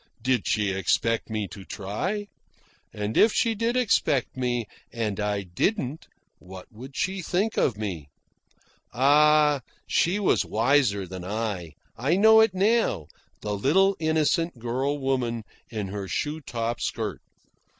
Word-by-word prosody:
Did 125 -3 +1
she 105 -2 +1
expect 95 +5 0
me 110 -2 -2
to 100 - -10
try? 175 - -3 0.7
And 105 +1 -4
if 225 - +6
she 230 +1 +1
did 230 +3 0
expect 160 - +1
me, 120 -2 -1 0.3
and 110 -3 -3
I 105 -1 -1
didn't 135 - -2 0.3
what 90 0 -11
would 130 +5 -11
she 190 0 -1
think 195 +6 -1
of 115 - +1
me? 90 -9 -5 0.8
Ah, 150 +2 +4 0.2
she 175 +4 +2
was 200 - +2
wiser 115 -4 +2
than 90 0 -8
I 100 -5 -3 0.3
I 140 +8 +2
know 220 +2 +7
it 220 -4 +3
now 200 - +1 0.3
the 105 - -3
little 190 - +3
innocent 160 0 +1
girl 130 +5 -1
woman 130 -4 -1 0.3
in 105 -4 -4
her 100 0 -5
shoe 150 - -2
top 120 -3 -3
skirt. 105 - -3
125 Hz, 140 wpm, -26 LUFS, 105-160 Hz, 0.8 s, know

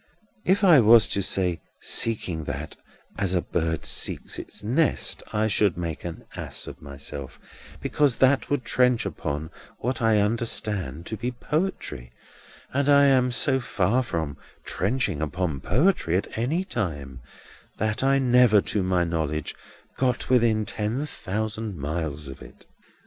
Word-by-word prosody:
If 195 +3 +3
I 175 -7 +8
was 115 -1 +7
to 100 - +1
say 90 -2 +1 0.2
seeking 90 -8 0
that, 75 +2 -5 0.4
as 95 -2 +1
a 90 - +2
bird 80 -1 -2
seeks - - 0
its - - -7
nest, 135 +9 +1
I 110 +1 +1
should 100 -4 +2
make 85 -3 -4
an 85 -2 -7
ass - - -5
of - - -10
myself, 70 -1 -6 0.4
because 145 -5 +2
that 135 +1 +3
would 145 -4 -1
trench 125 0 +2
upon 75 +3 -4 0.3
what 125 +2 -3
I 110 -1 +4
understand 105 - 0
to 110 - -4
be 120 - -2
poetry; 125 - -3 0.6
and 140 +1 +1
I 140 0 +6
am 130 -2 +4
so 130 +2 +3
far 110 0 +1
from 80 - -3 0.3
trenching 100 - -1
upon 80 -1 -2
poetry 125 - +2
at 100 - -4
any 140 +11 0
time, 75 - -4 0.6
that 110 +3 -1
I 135 +1 +4
never, 125 -4 +5
to 105 - +1
my 90 -1 +1
knowledge, 80 -3 -2 0.4
got 125 -1 0
within 115 -3 +3
ten 110 +8 -2
thousand 110 - -4
miles 75 0 -3
of 65 - -9
it. - - -14
105 Hz, 145 wpm, -25 LUFS, 85-125 Hz, 0.6 s, I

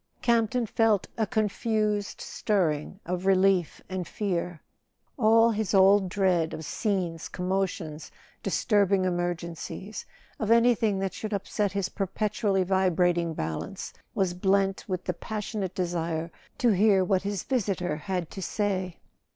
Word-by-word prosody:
Campton 235 +1 +2
felt 220 -2 +2
a 220 -2 0
confused 215 -2 0
stirring 180 -4 -1
of 180 +2 -3
relief 190 -3 +3
and 185 -2 -4
fear. 175 -5 -2 0.6
All 225 -2 +5
his 215 -2 -1
old 195 0 +5
dread 180 -4 +1
of 160 - -7
scenes, 180 -4 -2
commotions, 180 -4 -3 0.3
disturbing 200 -3 +2
emergencies—of 175 +4 -4
anything 230 -3 +4
that 190 -1 -2
should 215 -1 -5
upset 200 0 -1
his 200 -2 0
per¬ 195 -3 -3
petually 205 -2 0
vibrating 175 -3 +2
balance—was 80 - -3
blent 195 +1 +1
with 185 -2 -3
the 180 - -1
pas¬ 215 +5 -5
sionate 195 -4 -4
desire 170 -2 -2 0.3
to 245 - +3
hear 200 -2 +4
what 185 0 +2
his 200 -2 -3
visitor 190 - -1
had 180 0 -3
to 195 - -7
say. 190 -3 -2
190 Hz, 125 wpm, -27 LUFS, 180-210 Hz, 0.6 s, All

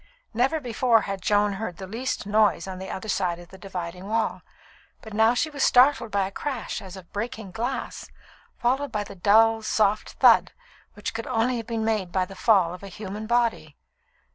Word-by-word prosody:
Never 260 +8 +1
before 240 -3 +2
had 195 -2 -5
Joan 205 +1 +2
heard 195 -3 -5
the 190 - -7
least 230 +6 -3
noise 205 -4 +2
on 185 -1 -6
the 190 - -7
other 190 - -6
side 180 -4 0
of 175 0 -13
the 190 - -13
dividing 180 -1 -6
wall, 225 +1 -1 0.6
but 220 - -10
now 220 +3 +4
she 310 +5 0
was 285 -2 -5
startled 250 -2 +5
by 200 -2 +1
a 190 - -6
crash 260 +2 -4
as 190 -1 -10
of 180 -2 -14
breaking 220 -2 -5
glass, 240 +7 -4 0.5
followed 265 +3 0
by 210 -2 -1
the 200 - -10
dull, 220 +4 +4
soft 215 -1 +1
thud - - +5 0.4
which 210 - -5
could 225 0 -5
only 245 0 +1
have 225 -1 -6
been 225 -2 -2
made 210 -5 -1
by 185 0 +1
the 195 - -11
fall 185 -4 +3
of 180 - -10
a 200 - -8
human 210 +2 -7
body. 235 -1 0
215 Hz, 195 wpm, -25 LUFS, 195-230 Hz, 0.6 s, startled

